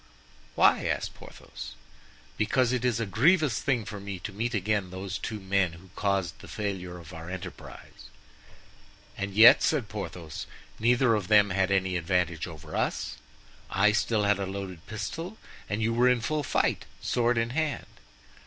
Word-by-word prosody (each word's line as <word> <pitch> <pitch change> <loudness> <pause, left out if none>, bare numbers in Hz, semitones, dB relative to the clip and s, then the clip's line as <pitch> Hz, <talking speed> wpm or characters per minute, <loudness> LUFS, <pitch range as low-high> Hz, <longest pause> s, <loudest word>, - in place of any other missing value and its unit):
"Why?" - - +4
asked - - -2
Porthos. - - -10 0.6
"Because 120 +3 +2
it 125 -1 0
is 120 -3 +1
a 115 - 0
grievous 140 - +3
thing 125 -6 0
for 105 0 -6
me 100 -1 -5
to 105 - -6
meet 115 +4 -2
again 100 -1 0
those 95 +1 -5
two 110 -2 -4
men 95 -3 +1
who 90 +2 -15
caused 100 -4 -1
the - - -12
failure 95 -4 -4
of 85 -3 -12
our 80 +1 -8
enterprise." 90 0 -9 1.1
"And 100 -1 -4
yet," 110 +3 +9
said 140 -9 +1
Porthos, 90 -6 -6 0.3
"neither 120 +1 +4
of 105 -4 -1
them 105 -2 +5
had 95 0 +1
any 95 -1 +1
advantage 85 -1 0
over 80 -4 -9
us. 65 0 -1 0.5
I 105 +2 +4
still 105 0 +1
had 100 -1 +2
a 100 - -2
loaded 95 -3 -6
pistol 165 - -5 0.3
and 105 +2 -1
you 115 +1 +1
were 125 +2 +4
in 125 -2 +2
full 155 +5 -1
fight, 145 - 0
sword 120 0 +1
in 115 +1 0
hand." 155 +1 -1
105 Hz, 165 wpm, -28 LUFS, 95-115 Hz, 1.1 s, yet